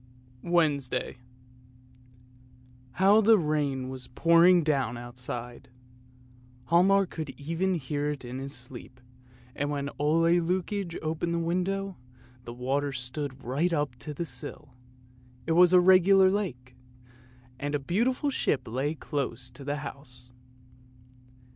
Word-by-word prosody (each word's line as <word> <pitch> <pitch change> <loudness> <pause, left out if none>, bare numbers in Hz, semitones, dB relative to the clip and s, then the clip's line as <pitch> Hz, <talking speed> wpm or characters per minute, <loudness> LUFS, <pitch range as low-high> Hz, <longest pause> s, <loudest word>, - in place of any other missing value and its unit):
WEDNESDAY 145 -8 0 1.8
How 200 +4 +5
the 220 +1 +6
rain 145 -6 -1
was 130 -1 -8
pouring 170 +5 +5
down 135 -5 0
outside! 120 +1 -8 1.0
Hialmar 195 +3 +5
could 160 -4 -6
even 165 +6 -1
hear 145 -1 -2
it 145 -3 -5
in 125 +2 -6
his 135 +1 -6
sleep, 125 -2 -10 0.6
and 145 0 -2
when 140 -1 -3
Ole 155 +3 +2 0.2
Lukoie 180 +1 -2
opened 160 +2 -2
the - - 0
window, 185 +3 -2 0.5
the 120 - -7
water 135 +3 -1
stood 130 +1 -5
right 145 +9 0
up 145 -6 -1
to 150 - -7
the 160 +4 -4
sill; 130 +1 -5 0.7
it - - -2
was 175 +1 +6
a 180 - +7
regular 190 +1 +6
lake, 130 -12 -4 0.8
and 145 +1 -2
a - - 0
beautiful 235 - 0
ship 150 - -1
lay 135 +7 -2
close 130 -5 -4
up - - -25
to 140 - -9
the 145 +1 -2
house. 125 -3 -10
150 Hz, 130 wpm, -28 LUFS, 130-175 Hz, 1.8 s, a